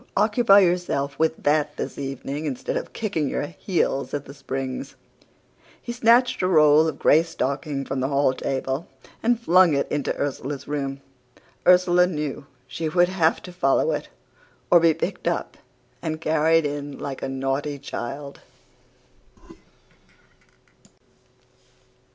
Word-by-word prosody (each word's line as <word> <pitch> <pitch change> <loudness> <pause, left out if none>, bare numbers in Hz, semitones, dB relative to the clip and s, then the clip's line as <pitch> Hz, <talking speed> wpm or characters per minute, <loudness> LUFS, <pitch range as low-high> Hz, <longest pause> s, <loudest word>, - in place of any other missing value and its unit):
Occupy 210 -1 +5
yourself 175 -6 0
with 160 0 0
that 150 0 +1
this - - -4
evening 140 +2 -5
instead 135 -4 -3
of - - -4
kicking 165 -10 -2
your - - -2
heels 145 -5 -2
at 145 -1 -5
The 140 - -10
Springs!' 135 -2 -5 0.8
"He 240 - -6
snatched 240 0 +3
a 185 - +2
roll 155 -2 +5
of 160 - -3
gray 155 - +5
stocking 140 -3 -3
from 135 - -3
the 130 - 0
hall 140 -1 +2
table 135 +3 -3 0.3
and 235 0 +2
flung 180 -7 +4
it 140 - 0
into 145 -2 -1
Ursula's 140 0 -4
room. 140 -2 -3 0.7
Ursula 180 0 +5
knew 150 -4 -4 0.2
she 160 -1 -4
would 175 +2 +3
have 170 -4 +1
to 180 - -10
follow 135 -6 +2
it, - - -4 0.6
or 175 - +8
be 165 -2 +4
picked 165 - -4
up - - -2 0.5
and 155 -1 -3
carried 160 0 +2
in 145 -1 -4
like 135 -2 -6
a - - -3
naughty 135 +2 -2
child. 140 +1 -7
150 Hz, 135 wpm, -23 LUFS, 140-175 Hz, 0.8 s, or